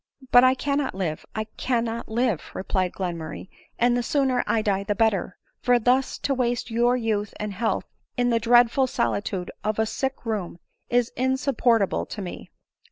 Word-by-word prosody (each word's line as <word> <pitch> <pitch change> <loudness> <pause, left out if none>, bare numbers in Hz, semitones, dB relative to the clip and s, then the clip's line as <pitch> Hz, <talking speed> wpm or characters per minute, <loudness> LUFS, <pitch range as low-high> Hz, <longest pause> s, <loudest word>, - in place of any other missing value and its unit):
" 265 -2 -19
But 245 - +8
I 255 0 +5
cannot 280 -3 -1
live, 170 -5 -3
I 215 - -1
cannot 230 +1 -2
live," 230 -5 +1
replied 185 -1 -1
Glenmur 170 -4 -4
ray, 185 - -8
" - - -34
and 240 +1 +3
the 245 - +1
sooner 260 0 +1
I 220 -1 +1
die 200 -2 0
the 205 +1 -1
better; 205 -4 +1 0.2
for 245 0 +4
thus 250 +3 +1
to 280 - +1
waste 245 -2 -1
your 240 +2 +3
youth 215 -3 -2
and 210 -1 -3
health 220 +3 -1 0.3
in 245 0 +2
the 230 - +3
dreadful 240 +3 +4
solitude 120 - -2
of 215 0 -1
a 220 - +2
sick 265 +4 -3
room 205 -7 -3 0.3
is 245 -1 +2
insupportable 255 -4 +1
to 210 - -6
me." 180 - -8
230 Hz, 180 wpm, -25 LUFS, 205-245 Hz, 0.3 s, But